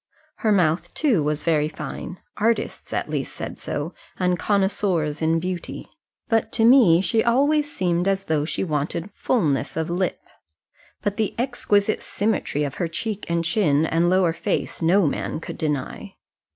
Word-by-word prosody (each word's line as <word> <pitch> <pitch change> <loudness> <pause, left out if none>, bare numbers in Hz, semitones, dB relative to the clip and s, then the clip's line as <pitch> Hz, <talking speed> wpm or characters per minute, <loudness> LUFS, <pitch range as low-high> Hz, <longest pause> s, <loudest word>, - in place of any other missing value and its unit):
Her 220 - +1
mouth, 175 -3 +1
too, 255 - +2
was 150 0 -1
very 155 -3 +2
fine 170 +3 -7 0.2
artists, 230 +2 -1
at - - -1
least, - - -3
said - - -6
so, - - -4 0.2
and 180 -1 +1
connoisseurs 190 -6 0
in 165 +1 +2
beauty; 180 +1 -5 0.4
but 225 -2 +1
to 225 - +3
me 230 -9 +7
she 220 +4 +2
always 290 +5 +2
seemed 175 -3 0
as 195 0 0
though 155 -2 +1
she 155 - -2
wanted 165 +3 -2
fulness 165 - 0
of 160 +1 -1
lip. 180 +1 -1 0.8
But 205 0 -1
the 220 -2 -1
exquisite 220 -4 +1
symmetry 200 -8 -1
of 140 -2 -3
her 170 - +1
cheek 205 +5 -4
and 170 0 0
chin 160 -4 +2
and 165 +2 +2
lower 180 -2 +3
face 190 +1 -2
no 175 +3 +4
man 150 - -2
could - - -8
deny. 150 -4 -3
180 Hz, 160 wpm, -23 LUFS, 160-210 Hz, 0.8 s, me